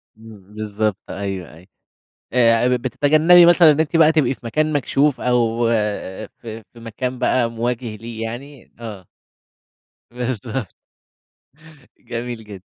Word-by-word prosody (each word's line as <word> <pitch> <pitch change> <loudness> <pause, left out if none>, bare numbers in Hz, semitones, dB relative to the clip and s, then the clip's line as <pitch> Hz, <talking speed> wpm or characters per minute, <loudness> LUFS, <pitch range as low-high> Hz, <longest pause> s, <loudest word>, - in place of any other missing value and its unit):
م 105 -3 -15
بالضبط 105 -1 -2
أيوه 95 -5 -5
أيوه. 85 +3 -17 0.7
آآ 120 0 +4
بتتجنبي 155 +7 +5
مثلًا 175 -2 +7
إن 150 +1 +2
أنتِ 160 +1 0
بقى 160 -1 +6
تبقي 135 -5 +2
في - - -24
مكان 155 +6 0
مكشوف 145 0 +1
أو 120 -1 +1 0.7
في 115 -1 -9
في 120 - -15
مكان 125 +3 -5
بقى 120 -2 +1
مواجه 115 -1 -3
ليه 115 +1 -8
يعني 125 +4 -8
آه. 105 -6 -8 1.0
بالضبط. 125 -2 -4 1.3
جميل 120 -1 -6
جدًا. 100 -3 -10
120 Hz, 125 wpm, -20 LUFS, 110-135 Hz, 1.3 s, مثلًا